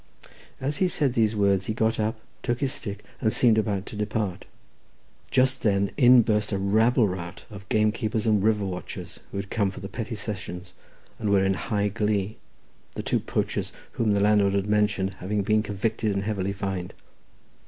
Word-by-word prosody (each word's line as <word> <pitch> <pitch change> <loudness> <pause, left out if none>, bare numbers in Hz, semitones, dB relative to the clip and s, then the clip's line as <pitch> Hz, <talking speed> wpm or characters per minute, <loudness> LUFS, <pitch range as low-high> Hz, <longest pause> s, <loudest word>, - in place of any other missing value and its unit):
As 140 +3 -1
he 185 - +3
said 145 -7 +1
these 110 -2 +2
words 100 -2 +2
he 110 - -1
got 110 -1 +1
up, 110 +1 -1 0.2
took 120 -1 -1
his 135 -1 0
stick, 105 -8 -6
and 110 -4 +1
seemed 115 -2 +4
about 100 -3 -1
to - - -8
depart. 105 -2 -2 0.8
Just 130 +1 +2
then 100 -2 +2
in 125 -3 +7
burst 105 -1 0
a 100 - 0
rabble 110 +4 +3
rout 90 -1 -6
of 100 -2 -11
gamekeepers 110 +1 +1
and 105 -3 +3
river 105 -1 +2
watchers, 90 -2 -6
who - - -6
had 100 0 -5
come 100 -4 +1
from 95 - -9
the - - -3
petty 115 +2 -5
sessions, 95 -4 -6 0.5
and 110 -3 -1
were 100 -1 +4
in 95 - +3
high 105 +1 -1
glee, 105 -1 -1 0.6
the - - -4
two - - +1
poachers - - -2 0.2
whom 110 -3 +1
the 100 - +2
landlord 100 -1 +3
had 100 -1 +1
mentioned 105 -2 +1
having 100 +2 -1
been 110 +1 +3
convicted 105 +1 -1
and 100 0 -1
heavily 100 -2 -1
fined. 95 -2 -4
105 Hz, 185 wpm, -26 LUFS, 100-110 Hz, 0.8 s, in